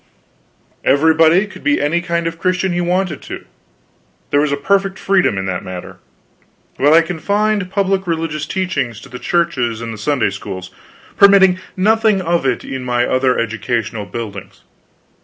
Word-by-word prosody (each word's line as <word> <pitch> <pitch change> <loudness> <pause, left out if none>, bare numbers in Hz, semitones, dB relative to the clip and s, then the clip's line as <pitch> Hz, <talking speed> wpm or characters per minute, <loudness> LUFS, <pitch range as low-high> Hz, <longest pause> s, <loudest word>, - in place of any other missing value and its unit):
Everybody 160 +5 +4
could 205 - -13
be 285 +1 +2
any 165 +4 +1
kind 170 -1 -2
of 165 - -1
a - - -20
Christian 185 +1 0
he 175 - 0
wanted 180 -3 -1
to; - - -8 0.9
there 145 - +3
was 150 0 +1
perfect 195 -1 +1
freedom 190 - +2
in 95 - -2
that 90 -2 -3
matter. 90 -1 -8 0.8
But 145 +2 +4
I 165 +1 +6
confined 200 +4 -1
public 195 -1 0
religious 160 -2 -2
teaching 180 -10 -2
to 120 +5 -12
the 125 -1 -8
churches 130 -10 0
and 115 -1 -5
the 110 - -9
Sunday 125 -2 0
schools, 95 -2 -7 0.5
permitting 190 -2 +6 0.2
nothing 215 +1 +3
of 170 -5 0
it 125 - -1
in 130 -1 -5
my 120 -1 +1
other 130 0 +1
educational 115 -1 -2
buildings. 105 -4 -7
160 Hz, 160 wpm, -17 LUFS, 120-185 Hz, 0.9 s, I